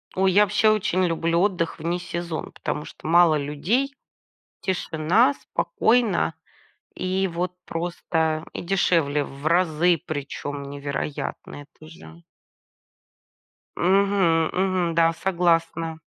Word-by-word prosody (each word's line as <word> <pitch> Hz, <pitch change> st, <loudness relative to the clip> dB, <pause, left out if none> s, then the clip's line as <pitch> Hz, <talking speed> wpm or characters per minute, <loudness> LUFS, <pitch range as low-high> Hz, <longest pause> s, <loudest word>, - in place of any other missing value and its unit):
Ой, 190 Hz, -1 st, +2 dB
я 205 Hz, -, +6 dB
вообще 210 Hz, +2 st, +3 dB
очень 185 Hz, -3 st, +1 dB
люблю 165 Hz, 0 st, 0 dB
отдых 180 Hz, -5 st, 0 dB
в -, -, -9 dB
несезон, 175 Hz, -1 st, -3 dB
потому 150 Hz, -, -4 dB
что -, -, -10 dB
мало 170 Hz, -1 st, +5 dB
людей, 200 Hz, -, -1 dB, 0.7 s
тишина, 190 Hz, -, +1 dB
спокойно 240 Hz, -, +1 dB, 0.6 s
и 190 Hz, +1 st, -1 dB
вот 175 Hz, +1 st, -3 dB
просто. 165 Hz, -2 st, -2 dB
И -, -, -5 dB
дешевле 165 Hz, -5 st, +1 dB
в 140 Hz, +3 st, -6 dB
разы, 170 Hz, -1 st, +3 dB
причём 145 Hz, -1 st, -5 dB
невероятно, 140 Hz, +1 st, -5 dB
это 155 Hz, +2 st, -17 dB
же. 85 Hz, -, -14 dB, 1.5 s
Мгм. 185 Hz, -3 st, +3 dB
Мгм. 185 Hz, -3 st, 0 dB
Да, 165 Hz, 0 st, +4 dB
согласна. 165 Hz, -2 st, 0 dB
170 Hz, 110 wpm, -24 LUFS, 155-185 Hz, 1.5 s, я